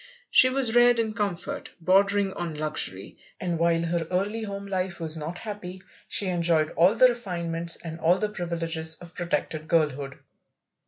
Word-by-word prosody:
She 255 - +7
was 255 -3 +1
reared 240 0 +6
in 220 -1 0
comfort, 200 -5 -4
bordering 195 +2 +3
on 170 -3 -4
luxury, 150 -11 -3 0.2
and 175 -3 -2
while 170 0 +2
her 170 -1 -1
early 200 +5 -1
home 200 -2 -5
life 185 -2 -3
was 160 -1 -2
not 160 +3 -5
happy, 190 -4 -7 0.2
she 205 - +1
enjoyed 170 -3 +2
all 180 +6 +4
the 255 +2 +7
refinements 170 -7 -2
and 165 -1 -8
all 170 +3 +3
the 210 +2 -1
privileges 165 -4 -1
of 175 0 -13
protected 155 -2 -3
girlhood. 145 -4 0
175 Hz, 160 wpm, -26 LUFS, 165-200 Hz, 0.2 s, She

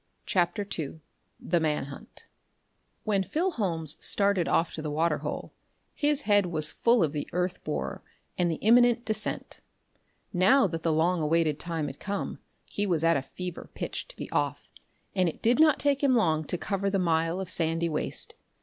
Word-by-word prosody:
CHAPTER 180 +2 0
II 155 +1 -5 0.4
The 175 0 0
Man 155 -3 0
Hunt 140 0 -9 0.8
When 200 -3 +1
Phil 345 - -1
Holmes 165 - +2
started 200 -3 +2
off 165 - +1
to 155 - -5
the 155 - -4
water 155 +1 0
hole, - - -5 0.4
his 295 -1 +1
head 205 -5 +3
was 155 -3 +3
full 235 -4 +3
of 155 - 0
the 150 - -4
earth 180 +1 -2
borer 65 -2 -4 0.3
and 175 -1 +1
the 165 - -1
imminent 240 +3 +4
descent. 215 -1 -1 0.7
Now 200 +9 +5
that 165 -3 -3
the 165 - +1
long 165 +2 +1
awaited 155 -1 +1
time 165 -2 -2
had 140 -1 -7
come, 200 -1 -4 0.3
he 205 0 -3
was 165 -4 +1
at 165 -5 +3
fever 180 +5 -7
pitch - - -5
to - - -9
be - - -6
off, - - -2 0.4
and 185 -3 +2
it - - -9
did 240 +4 +3
not 310 -2 +6
take 280 -1 +1
him 265 -3 +4
long 160 -8 +2
to 180 - -2
cover 195 +1 -2
the 195 - 0
mile 165 -1 +1
of 190 - -4
sandy 165 -1 +1
waste. 155 -2 -1
175 Hz, 180 wpm, -28 LUFS, 160-205 Hz, 0.8 s, not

